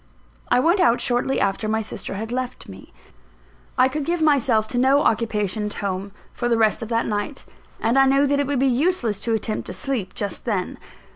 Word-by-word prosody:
I - - +4
went 340 +9 +3
out 245 -10 +4
shortly 245 +2 +1
after 195 +2 0
my 220 +1 0
sister 200 - -6
had 220 +3 -5
left 255 0 -4
me. - - -12 0.9
I 255 0 +5
could 295 +3 -3
give 340 +4 -1
myself 265 -8 +3
to 245 - -1
no 270 +3 +4
occupation 215 -2 0
at 210 - -6
home, 195 0 -3 0.2
for 240 - -2
the 230 - +3
rest 220 -2 +2
of 225 - -5
that 230 0 0
night; 210 +6 -3 0.3
and 235 +4 +2
I 270 - +5
knew 275 +1 +4
that 285 0 +1
it 285 - 0
would 285 -1 0
be 265 - +2
useless 255 - +1
to 230 - -1
attempt 220 0 -2
to - - -5
sleep 230 -9 -3
just 205 -2 -4
then. 200 -6 -2
240 Hz, 210 wpm, -22 LUFS, 215-270 Hz, 0.9 s, I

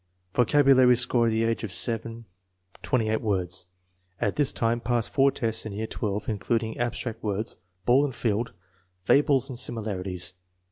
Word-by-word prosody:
Vocabulary 130 -1 +5
score 120 -1 +2
at - - +3
the 110 0 +1
age 115 0 -1
of 110 - -4
7, 115 +2 0 0.6
28 110 -3 0
words. 90 -4 -1 0.5
1 - - 0
At - - -7
this 145 -2 +2
time 115 +1 0
passed 120 -1 -1
four 140 0 +4
tests 115 -3 0
in 110 - -6
year 110 +2 -3
1$, 105 -2 -4
including 110 +1 -2
abstract 120 -1 -3
words, 105 +1 -2 0.3
ball 130 +3 +5
and 135 -4 -2
field, 115 0 -1 0.5
fables 135 +4 +3
and 130 -4 -5
similarities. 95 -6 -2
115 Hz, 155 wpm, -26 LUFS, 105-125 Hz, 0.6 s, Vocabulary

